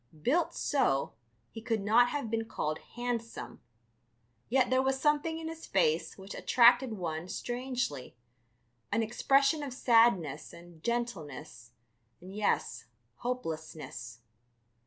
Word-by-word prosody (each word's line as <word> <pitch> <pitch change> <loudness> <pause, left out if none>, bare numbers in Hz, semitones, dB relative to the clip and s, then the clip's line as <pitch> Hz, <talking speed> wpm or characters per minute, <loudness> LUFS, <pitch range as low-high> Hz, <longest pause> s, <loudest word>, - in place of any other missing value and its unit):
Built 310 - +1
so, 140 - +1 0.4
he 225 - -8
could 225 -2 -1
not 230 +5 +5
have 280 -7 -3
been 225 0 0
called 155 -8 -3 0.2
handsome, 235 - -4 0.9
yet 255 0 +3
there 255 0 +4
was 265 0 0
something 300 +2 +1
in 325 0 -5
his 325 0 -8
face 170 -4 +1
which 195 +1 -9
attracted 245 0 +5
one 170 -4 -4
strangely, 245 - -3 0.8
an 225 +2 +2
expression 275 +6 +2
of 280 -3 -5
sadness 225 - +3
and 170 -1 -14
gentleness 155 - -4 0.5
and, 185 +2 -11
yes... 210 0 0 0.3
hopelessness. 160 - -5
230 Hz, 115 wpm, -31 LUFS, 170-255 Hz, 0.9 s, not